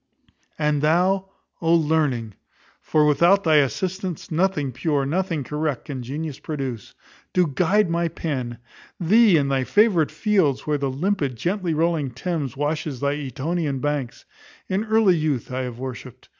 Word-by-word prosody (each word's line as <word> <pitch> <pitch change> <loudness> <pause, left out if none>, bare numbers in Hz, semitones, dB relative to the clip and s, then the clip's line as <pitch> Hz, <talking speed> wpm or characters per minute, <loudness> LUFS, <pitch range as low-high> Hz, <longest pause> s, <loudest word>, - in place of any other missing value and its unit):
And 150 -2 +1
thou, 185 +5 +2 0.3
O 165 0 +4
Learning! 150 -9 +1 0.5
(for 155 -1 +2
without 170 +7 +4
thy 155 -2 +4
assistance 180 +6 -1
nothing 160 -5 0
pure, 140 +2 0
nothing 165 0 -1
correct, 150 -1 -3
can 135 -3 -5
genius 145 +4 -5
produce) 135 -8 -5 0.4
do 180 - +4
thou 150 - -5 0.2
guide 210 0 +3
my 170 0 +1
pen. 135 -8 -4 0.4
Thee 200 +1 +5
in 140 -2 +1
thy 135 -1 +1
favourite 195 - +3
fields, 190 - +1
where 150 -1 0
the 140 -1 -1
limpid, 145 -1 -1
gently 180 - -1
rolling 160 -3 +1
Thames 140 0 -4
washes 145 -2 -2
thy 140 +1 0
Etonian 145 +2 -2
banks, 145 -3 -3 0.4
in 195 +3 -1
early 220 -4 +4
youth 150 -6 -1
I 130 +1 -2
have 125 -2 -5
worshipped. 130 -2 -8
155 Hz, 150 wpm, -23 LUFS, 135-175 Hz, 0.5 s, Thee